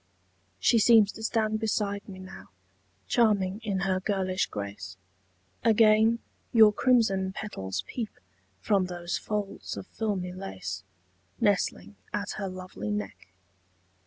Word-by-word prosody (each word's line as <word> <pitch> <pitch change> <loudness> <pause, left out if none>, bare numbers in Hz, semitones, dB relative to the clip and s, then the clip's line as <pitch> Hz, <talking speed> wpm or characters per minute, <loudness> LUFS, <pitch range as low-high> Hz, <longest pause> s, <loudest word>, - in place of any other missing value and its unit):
She 230 - +4
seems 220 -2 +6
to - - -11
stand 220 -1 0
beside 205 -2 -1
me 190 - -8
now, 185 0 -11 0.6
Charming 205 - +2
in 200 -3 -1
her 190 -1 +1
girlish 190 -1 0
grace; 100 -3 -6 0.7
Again 220 0 +5 0.3
your 220 -2 +7
crimson 195 -7 +2
petals 95 - -4
peep 225 - -4 0.5
From 195 - +2
those 175 0 -3
folds 210 -2 -4
of - - -6
filmy 195 -5 -3
lace 95 - -6 0.6
Nestling 205 0 0
at 205 -1 -2
her 200 -2 -3
lovely 185 - -6
neck. 105 -2 -4
200 Hz, 120 wpm, -28 LUFS, 185-215 Hz, 0.7 s, your